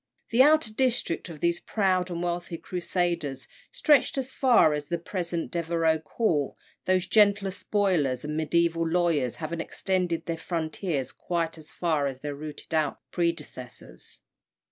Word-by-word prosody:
The 240 +2 +5
outer 295 -5 +5
district 245 -9 0
of 155 -3 -9
these 170 0 +2
proud 185 -2 +1
and 175 0 -3
wealthy 175 -1 -3
Crusaders 170 -6 -2 0.2
stretched 305 - +3
as 265 -1 -3
far 240 - +5
as 145 -1 -3
the 170 - -1
present 170 -1 -4
Devereux 165 -1 +1
Court; 155 - -1 0.3
those 185 -1 +2
gentler 200 -1 +4
spoilers, 180 - 0
the - - -5
mediæval 165 +1 +1
lawyers, 165 -8 +1
having 165 +1 -4
extended 180 -2 -1
their 165 -1 -2
frontiers 160 -4 -2
quite 170 -2 -2
as 155 - -12
far 155 -5 0
as 130 -1 -6
their 145 -1 -3
rooted 150 +2 -8
out 155 -3 +1
predecessors. 165 -8 -4
170 Hz, 145 wpm, -27 LUFS, 155-185 Hz, 0.3 s, The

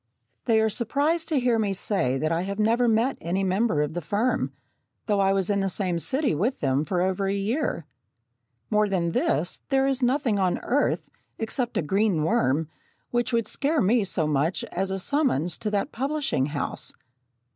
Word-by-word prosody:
They 225 -2 +4
are 220 - +3
surprised 290 +9 0
to 305 -4 +2
hear 245 -2 +2
me 205 -3 0
say 180 - 0
that 155 +3 -1
I 165 +1 +1
have 200 +2 -4
never 230 +3 +2
met 230 +4 +1
any 180 +4 -1
member 190 -4 +1
of 150 +1 -4
the 175 - -3
firm, 210 +10 0 0.5
though 205 -2 +1
I 195 0 +3
was 195 -2 +1
in 200 - +1
the 195 0 0
same 180 -2 -1
city 270 - 0
with 210 - 0
them 135 +1 +1
for 180 0 0
over 190 +1 0
a 195 - 0
year. 205 - -1 0.9
More 210 -1 +3
than 175 -3 0
this, 165 +1 0
there 270 0 +3
is 270 -1 0
nothing 250 -4 +1
on 185 -2 +1
earth, 285 +4 0 0.3
except 235 +2 -2
a - - +1
green 190 0 +1
worm, 150 0 +1 0.4
which 240 0 0
would 230 -2 +1
scare 290 +7 0
me 220 +2 +3
so 180 -4 -1
much 150 +4 0
as 190 +2 -1
a 190 - -1
summons 185 - +1
to 215 - -2
that 210 +6 -1
publishing 275 - -1
house. 145 -1 -3
200 Hz, 190 wpm, -25 LUFS, 175-245 Hz, 0.9 s, They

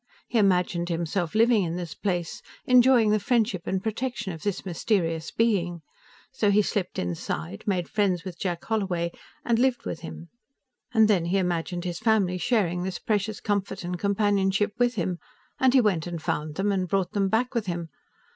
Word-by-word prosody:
He 235 - +1
imagined 180 -3 +2
himself 170 +1 -2
living 230 -1 +5
in 170 -1 -2
this 175 -2 -5
place, 175 -4 -3 0.2
enjoying 250 -3 +5
the 215 - +3
friendship 215 -4 0
and 190 0 -1
protection 230 -2 -3
of 160 - -9
this 200 +1 -3
mysterious 165 -3 -1
being. 180 -7 0 0.5
So 225 -6 +1
he 205 +1 +4
slipped 195 -2 -2
inside, 85 +1 -4
made 180 -4 0
friends 190 -5 0
with 180 -3 -8
Jack 175 -3 -3
Holloway 185 -6 -1 0.3
and 230 -1 +2
lived 255 -1 +1
with - - -4
him. 165 0 -9 0.6
And 220 -2 +5
then 190 -6 +2
he 180 +3 +1
imagined 175 -1 -1
his 175 -1 -3
family 210 -5 +2
sharing 180 -6 +1
this 180 -1 -3
precious 210 -1 -1
comfort 200 -3 -2
and 175 0 -4
companionship 200 0 +1
with 245 0 +2
him, 180 -3 -2 0.4
and 260 -1 +5
he 260 0 +5
went 185 -7 +1
and 175 -1 -4
found 155 -2 -3
them 200 +3 +1
and 185 -2 0
brought 190 0 0
them 200 -2 +1
back 245 +5 +1
with 230 -4 -1
him. 170 -2 -3
190 Hz, 180 wpm, -26 LUFS, 175-215 Hz, 0.6 s, living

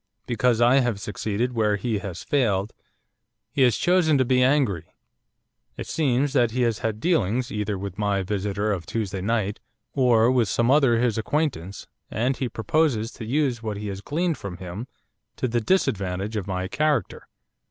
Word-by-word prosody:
Because 120 0 +1
I 120 +3 +5
have 120 -6 0
succeeded 105 +4 -2
where 105 -3 +2
he 105 +1 -2
has 100 -4 -7
failed, 105 -7 0 0.8
he 140 - -1
has 125 -4 +4
chosen 175 -4 +3
to 130 - +2
be 125 +1 +3
angry. 130 - +2 0.9
It - - -5
seems 140 -2 0
that 120 -5 +3
he 125 +2 0
has 115 -3 0
had 110 -1 -2
dealings, 125 - +1
either 105 -1 -2
with 100 0 -6
my 100 -2 +1
visitor 105 +1 -1
of 90 -4 -5
Tuesday 100 -4 -3
night, 105 0 -1 0.3
or 120 -3 +4
with 120 -5 +2
some 120 +5 +2
other 135 -5 +4
his 115 -2 +1
acquaintance, 110 - -2 0.2
and 125 +5 0
he 130 -2 -3
proposes 115 -1 0
to 115 - -8
use 130 -1 0
what 110 -2 -4
he 105 0 -5
has 95 0 -6
gleaned 160 - -1
from 100 -4 -6
him 95 +7 -7 0.5
to - - -1
the 120 0 0
disadvantage 100 - 0
of 100 -3 -3
my 95 -1 -2
character. 145 -1 -1
115 Hz, 175 wpm, -24 LUFS, 100-130 Hz, 0.9 s, I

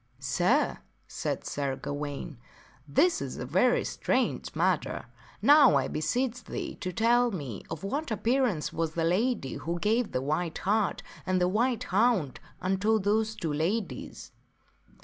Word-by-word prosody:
" 125 +1 -37 0.2
Sir," 240 +12 +2 0.3
said - - -3
Sir 140 -2 -2
Gawaine, 145 -1 -5 0.3
" 130 - -29
this 345 0 +4
is - - -5
a - - -4
very - - +3
strange - - -1
matter. - - 0 0.4
Now 290 - +7
I 135 -2 +2
beseech 245 +9 -1
thee - - -5
to 185 - -4
tell 240 +5 +3
me 140 - -5
of 160 +1 -6
what 280 +10 -2
appearance 230 - 0
was 165 -1 -1
that 165 -1 +1
lady 190 - 0
who 170 +2 -3
gave 220 +5 +1
the - - 0
white 155 +4 -1
hart 210 +2 0 0.2
and 185 0 +1
the 180 - +3
white 235 +5 +1
hound 200 - +1 0.2
unto 195 +4 +1
those 215 +2 +1
two 165 -8 -3
ladies 185 +8 -3
195 Hz, 150 wpm, -29 LUFS, 155-235 Hz, 0.4 s, Now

